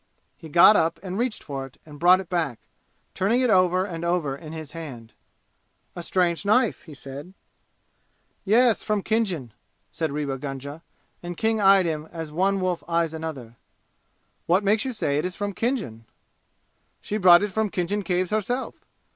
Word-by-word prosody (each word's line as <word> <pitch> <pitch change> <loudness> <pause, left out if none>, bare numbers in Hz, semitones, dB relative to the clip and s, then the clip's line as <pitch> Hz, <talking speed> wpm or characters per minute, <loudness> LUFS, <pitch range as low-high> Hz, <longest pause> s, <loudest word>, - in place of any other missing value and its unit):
He 160 - -12
got 170 +7 +7
up 165 -1 +1
and 185 -1 -5
reached 235 +1 -2
for 135 -2 -5
it 135 - -21
and 150 -2 -12
brought 180 +2 +6
it 190 - -7
back, 165 -9 -1 0.6
turning 215 +7 +1
it 250 -3 +2
over 185 -1 +3
and 170 -4 -6
over 170 -5 0
in 155 +2 -10
his 160 -2 -7
hand. 130 -9 -9 0.8
"A 175 - -5
strange 175 0 0
knife," 215 +3 +2
he 155 -4 -11
said. 140 +8 -10 1.1
"Yes, 230 +2 +3
from 210 -2 -1
Khinjan," 190 - -1 0.4
said 160 -3 -2
Rewa 140 -2 -3
Gunga, 140 +2 -6 0.4
and 175 -1 -7
King 220 -1 +1
eyed 195 -1 +6
him 155 -2 -3
as 160 -3 -6
one 195 +5 +1
wolf 180 -2 -1
eyes 165 -1 0
another. 140 -8 -7 0.9
"What 185 +4 +3
makes 210 +3 +2
you 260 - -3
say 145 -10 0
it 155 - -2
is 180 0 -4
from 205 0 -3
Khinjan?" 200 - -3 0.9
"She 210 - -4
brought 180 -2 +7
it 205 - -2
from 220 +1 0
Khinjan 190 +3 -2
Caves 185 -1 -1
herself! 220 +5 -2
175 Hz, 170 wpm, -24 LUFS, 155-205 Hz, 1.1 s, got